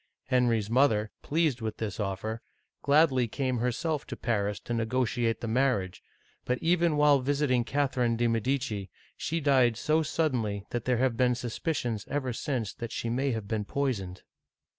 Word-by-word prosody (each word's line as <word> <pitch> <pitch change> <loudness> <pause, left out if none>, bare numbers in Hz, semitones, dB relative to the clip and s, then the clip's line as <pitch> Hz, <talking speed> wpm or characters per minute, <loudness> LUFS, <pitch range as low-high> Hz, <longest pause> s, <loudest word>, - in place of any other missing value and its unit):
Henry's 120 -5 +2
mother, 110 -3 +2
pleased 150 -5 0
with 110 -1 -3
this 110 -2 -4
offer, 105 +3 -3 0.4
gladly 140 -4 +4
came 130 +1 -1
herself 135 +6 -1
to - - -6
Paris 105 -3 -1
to 120 - -4
negotiate 115 0 0
the 115 - -3
marriage, 115 -6 0 0.4
but 125 - 0
even 170 0 +2
while 150 -1 +5
visiting 135 -2 +1
Catherine 130 -3 0
de' 120 - +1
Medici, 115 -3 -1 0.3
she 165 +2 -2
died 130 -6 +3
so 155 +1 +2
sud 155 -1 0
denly 105 -4 -2
that 120 -1 -3
there 125 -1 +2
have 130 -1 +1
been 125 -1 +3
suspicions 120 -2 -3
ever 135 -3 -1
since 115 -4 -2
that 115 -1 -6
she 115 - -3
may 135 +4 0
have 110 -5 -3
been 110 -1 -1
poisoned. 100 -8 -3
125 Hz, 160 wpm, -29 LUFS, 110-140 Hz, 0.4 s, while